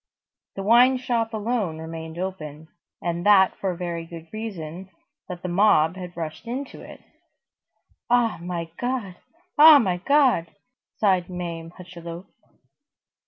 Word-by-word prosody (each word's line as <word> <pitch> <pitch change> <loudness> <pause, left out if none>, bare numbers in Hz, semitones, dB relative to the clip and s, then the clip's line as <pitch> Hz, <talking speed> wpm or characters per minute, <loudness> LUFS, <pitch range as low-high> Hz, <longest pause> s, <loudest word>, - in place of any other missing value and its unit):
The 195 - -4
wine 245 +5 +5
shop 235 -3 -1
alone 215 -6 -2
remained 160 0 -7
open; 160 -4 -6 0.3
and 170 0 -2
that 200 -2 +5
for 195 - -1
a 180 - -4
very 170 -2 -4
good 165 -1 -10
reason, 190 -5 -6 0.4
that 180 -1 -7
the - - -2
mob 175 -3 +3
had 180 -2 -9
rushed 160 +6 -6
into 260 +4 -5
it.—"Ah 240 -5 -5
my 170 -2 -5
God! 245 -8 -3 0.4
Ah 310 0 +10
my 190 -9 +1
God!" 250 - +3 0.5
sighed 185 -4 +2
Mame 170 -2 -5
Hucheloup. 175 -1 -9
180 Hz, 125 wpm, -24 LUFS, 170-225 Hz, 0.5 s, Ah